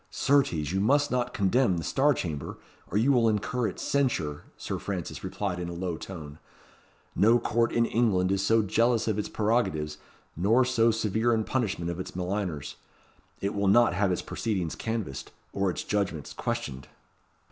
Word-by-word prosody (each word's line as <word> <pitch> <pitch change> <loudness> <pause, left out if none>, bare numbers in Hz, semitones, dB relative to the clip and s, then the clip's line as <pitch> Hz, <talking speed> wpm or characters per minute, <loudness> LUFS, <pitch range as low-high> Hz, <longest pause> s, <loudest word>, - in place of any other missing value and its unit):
"Certes, 140 -1 +2 0.2
you 95 - 0
must 145 +8 +3
not 125 -1 0
contemn 100 -1 +2
the 85 - -3
Star 140 - +2
Chamber, 75 - -4 0.3
or 100 - -1
you 120 +6 +4
will 120 -4 +4
incur 110 +3 0
its - - -6
censure," 115 - 0
Sir - - -4
Francis 95 -4 -5
replied 95 -4 -3
in 85 -1 -4
a - - -5
low 85 0 -3
tone. 80 -4 -9 0.8
"No 115 +4 +5
court 115 0 +1
in 115 0 +2
England 100 -6 +2
is 100 0 +1
so 110 +2 +3
jealous 115 +3 +2
of 105 -2 0
its 105 - -3
prerogatives, 80 -10 0 0.4
nor 115 +8 +3
so 115 -2 +3
severe 110 +1 +1
in 110 - 0
punishment 100 -9 -1
of 85 - -6
its 90 - -6
maligners. 90 -4 -3 0.6
It 100 +1 -1
will 100 -1 0
not 115 +1 +5
have 95 +1 +1
its 90 - -1
proceedings 95 -8 -2
canvassed, 110 - -4 0.2
or 100 -1 +1
its 90 - -3
judgments 100 -7 -2
questioned." 65 0 -4
105 Hz, 170 wpm, -28 LUFS, 90-115 Hz, 0.8 s, No